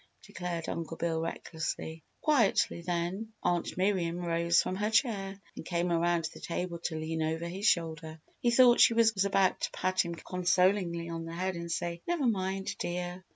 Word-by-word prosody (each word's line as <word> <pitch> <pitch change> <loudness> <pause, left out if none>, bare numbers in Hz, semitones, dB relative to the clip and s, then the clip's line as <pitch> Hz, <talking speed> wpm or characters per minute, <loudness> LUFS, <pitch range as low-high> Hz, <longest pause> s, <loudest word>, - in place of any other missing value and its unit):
declared 175 -2 -5
Uncle 165 0 -4
Bill, 165 -1 -1
recklessly. 160 -1 -4 0.2
Quietly 240 - +2
then, 180 +5 -3
Aunt 175 0 0
Miriam 185 -3 +1
rose 170 -1 +2
from 185 - 0
her 210 +1 0
chair 200 -5 +1 0.2
and - - -7
came 175 +1 -1
around 170 0 +2
the - - -11
table 170 0 -4
to 160 - -1
lean 160 +1 -3
over 160 +2 -1
his 195 +5 -2
shoulder. 160 -1 0 0.2
He 240 - +2
thought 240 0 +6
she 230 - +6
was 225 -1 +5
about 195 -1 +2
to - - 0
pat 185 0 +1
him 170 -1 -5
consolingly 180 -1 +1
on 165 0 -4
the 165 - -7
head 185 +2 -1
and 170 0 -5
say, 170 0 -2
"Never 340 -5 0
mind, 195 -3 -1
dear." 175 +1 -3
175 Hz, 175 wpm, -30 LUFS, 170-195 Hz, 0.2 s, thought